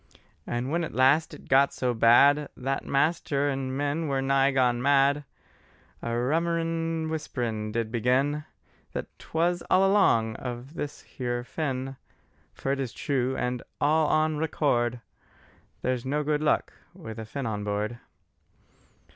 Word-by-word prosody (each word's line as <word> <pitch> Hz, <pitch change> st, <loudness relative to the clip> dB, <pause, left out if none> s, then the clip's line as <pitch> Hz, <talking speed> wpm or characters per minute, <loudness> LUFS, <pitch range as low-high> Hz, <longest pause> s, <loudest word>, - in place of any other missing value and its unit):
And 120 Hz, +3 st, -2 dB
when 170 Hz, +1 st, +1 dB
at 160 Hz, -, -5 dB
last 135 Hz, +5 st, +4 dB
it -, -, -12 dB
got 135 Hz, +1 st, +5 dB
so 125 Hz, -1 st, 0 dB
bad, 140 Hz, +6 st, +5 dB
That 135 Hz, +2 st, -2 dB
master 145 Hz, -1 st, +1 dB
and 135 Hz, -1 st, -2 dB
men 145 Hz, +3 st, -1 dB
were 135 Hz, -1 st, 0 dB
nigh 135 Hz, 0 st, +3 dB
gone 125 Hz, -3 st, +2 dB
mad, 140 Hz, +1 st, +3 dB, 0.8 s
A 115 Hz, 0 st, -2 dB
rummerin' 165 Hz, +3 st, 0 dB
whisper 155 Hz, -5 st, -3 dB, 0.3 s
did 110 Hz, 0 st, -2 dB
begin 130 Hz, +6 st, +1 dB, 0.5 s
That -, -, -3 dB
'twas 170 Hz, +2 st, 0 dB
all 190 Hz, +1 st, +5 dB
along 115 Hz, -, +3 dB
of 125 Hz, +3 st, -6 dB
this 145 Hz, -3 st, -5 dB
here 120 Hz, -1 st, -4 dB
Finn: 135 Hz, -1 st, -3 dB, 0.5 s
For 135 Hz, -, -3 dB
it 140 Hz, -, -1 dB
is 130 Hz, -3 st, -3 dB
true, 130 Hz, -2 st, -1 dB
and 125 Hz, -1 st, -2 dB, 0.2 s
on 155 Hz, +1 st, +2 dB
re 160 Hz, -, 0 dB
córd 120 Hz, -6 st, 0 dB, 0.8 s
There's 125 Hz, -2 st, 0 dB
no 145 Hz, +3 st, -1 dB
good 150 Hz, 0 st, 0 dB
luck 150 Hz, -, +1 dB, 0.2 s
with 110 Hz, 0 st, -8 dB
a 110 Hz, -, -5 dB
Finn 135 Hz, +4 st, -5 dB
on 105 Hz, -2 st, -2 dB
board. 105 Hz, +3 st, -2 dB
135 Hz, 145 wpm, -27 LUFS, 125-150 Hz, 0.8 s, got